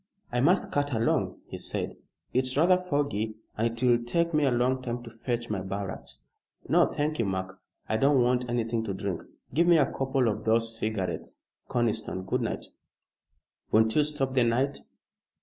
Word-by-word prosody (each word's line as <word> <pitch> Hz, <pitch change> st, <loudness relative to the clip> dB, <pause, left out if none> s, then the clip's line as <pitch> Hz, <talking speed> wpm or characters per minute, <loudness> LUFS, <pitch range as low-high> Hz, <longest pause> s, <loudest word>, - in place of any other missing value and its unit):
"I 120 Hz, 0 st, +1 dB
must 175 Hz, +7 st, +3 dB
cut 145 Hz, -1 st, 0 dB
along," 115 Hz, 0 st, 0 dB
he -, -, -8 dB
said; -, -, -4 dB, 0.4 s
"it's 130 Hz, +1 st, +1 dB
rather 175 Hz, +4 st, +6 dB
foggy 140 Hz, -, -1 dB, 0.2 s
and 115 Hz, +2 st, +1 dB
it 115 Hz, +1 st, -5 dB
will 120 Hz, -1 st, +4 dB
take 170 Hz, +7 st, 0 dB
me 150 Hz, -1 st, +3 dB
a -, -, +4 dB
long 125 Hz, +2 st, +1 dB
time 120 Hz, -1 st, -4 dB
to 115 Hz, -, -10 dB
fetch 120 Hz, 0 st, -3 dB
my 100 Hz, -, 0 dB
barracks. 95 Hz, 0 st, -5 dB, 0.4 s
No, -, -, +5 dB
thank 150 Hz, 0 st, -2 dB
you, 115 Hz, -, +2 dB
Mark, 95 Hz, 0 st, -3 dB, 0.3 s
I 110 Hz, -, +1 dB
don't 135 Hz, +3 st, +4 dB
want 125 Hz, 0 st, +1 dB
anything 115 Hz, -1 st, 0 dB
to 100 Hz, -3 st, -3 dB
drink. 95 Hz, -3 st, -3 dB, 0.3 s
Give 170 Hz, +3 st, +3 dB
me 170 Hz, -1 st, +7 dB
a 145 Hz, -, +5 dB
couple 135 Hz, -2 st, 0 dB
of 110 Hz, 0 st, -1 dB
those 115 Hz, 0 st, +2 dB
cigarettes, 110 Hz, -4 st, -3 dB, 0.3 s
Conniston. 110 Hz, -5 st, -1 dB
Good -, -, 0 dB
night." -, -, -3 dB, 1.1 s
"Won't 110 Hz, 0 st, +4 dB
you 150 Hz, -, +5 dB
stop 145 Hz, -3 st, -2 dB
the 130 Hz, -, +3 dB
night?" 130 Hz, +4 st, +1 dB
120 Hz, 180 wpm, -28 LUFS, 110-135 Hz, 1.1 s, me